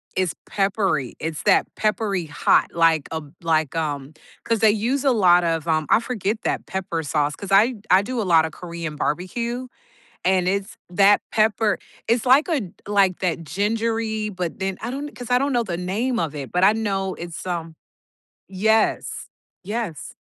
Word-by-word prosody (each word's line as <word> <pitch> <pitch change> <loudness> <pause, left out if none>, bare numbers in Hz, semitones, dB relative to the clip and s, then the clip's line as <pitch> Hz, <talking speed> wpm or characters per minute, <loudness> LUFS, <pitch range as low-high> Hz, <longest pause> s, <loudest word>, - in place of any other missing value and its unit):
It's 185 -3 0 0.2
peppery, 195 - 0
it's 160 -1 -4
that - - +4
peppery 210 -4 0
hot, 150 -1 +2
like 165 -3 +3
a 160 0 -3
b 145 -1 -15
like, 160 -3 +1
um 145 -3 -3 0.3
'Cause 230 -1 0
they 220 0 +5
use 240 +6 0
a 275 - +4
lot 180 -6 +5
of, 165 -1 -1
um 155 -1 +1
I - - +5
forget 225 -2 -2
that - - -1
pepper 180 -4 -3
sauce, 145 0 0
'cause 200 -1 -8
I 220 +6 +5 0.2
I 185 +1 +7
do 235 +3 -3
a - - -1
lot 165 -4 +4
of 160 - -5
Korean 170 -2 -6
barbecue, 235 +12 -2 0.6
and 185 -1 +2
it's 200 +3 -2
that 200 +3 +5
pepper, 215 -1 +2 0.3
it's 230 +1 +1
like 265 +4 +5
a 320 -6 +1
d 185 -5 -8 0.2
like 195 -3 +2
that 170 -2 -1
gingery, 220 +5 -1
but 180 -3 -4
then 190 -1 -2
I 235 - -4
don't 285 +3 -5
'Cause 245 -1 -7
I 245 - +5
don't 275 +1 0
know 240 -1 +2
the 175 -6 -4
name 215 +8 -1
of 155 -3 -2
it, 140 -3 -6
but 180 +1 +1
I 205 - +6
know 195 -4 -1
it's, 170 0 -8
um 165 -3 -4 0.7
Yes. 220 +3 +1 0.4
Yes. 205 - -4
195 Hz, 185 wpm, -22 LUFS, 165-220 Hz, 0.7 s, I